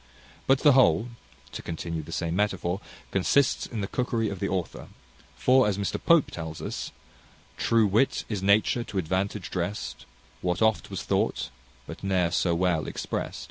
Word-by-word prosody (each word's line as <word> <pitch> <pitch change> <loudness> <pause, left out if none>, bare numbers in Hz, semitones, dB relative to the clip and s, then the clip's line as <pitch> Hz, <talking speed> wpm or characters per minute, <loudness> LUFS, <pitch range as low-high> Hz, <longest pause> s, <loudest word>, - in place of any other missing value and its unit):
But 135 0 +4
the 150 - +7
whole, 120 - +4 0.4
to - - -6
continue 85 0 -4
the 75 +2 -11
same 85 0 -2
metaphor, 95 -2 0 0.3
consists 120 +8 +2
in 115 -3 -4
the 100 - -2
cookery 115 -2 -1
of 100 -2 -6
the 100 - -1
author; 95 -3 -3 0.5
for, 130 -2 +4
as 100 -2 0
Mr 100 -1 -2
Pope 170 -4 +4
tells 80 -2 -6
us - - -5 0.6
"True 115 -1 +3
wit 110 +7 +2
is 105 -4 -3
nature 105 +4 +3
to 105 - -6
advantage 95 +3 -2
drest; 90 -3 -4 0.3
What 90 -1 0
oft 110 -1 +2
was - - -5
thought, - - 0 0.3
but - - -9
ne'er 90 -3 +1
so 85 -2 +1
well 85 -2 +1
exprest." - - -4
100 Hz, 165 wpm, -27 LUFS, 90-110 Hz, 0.6 s, the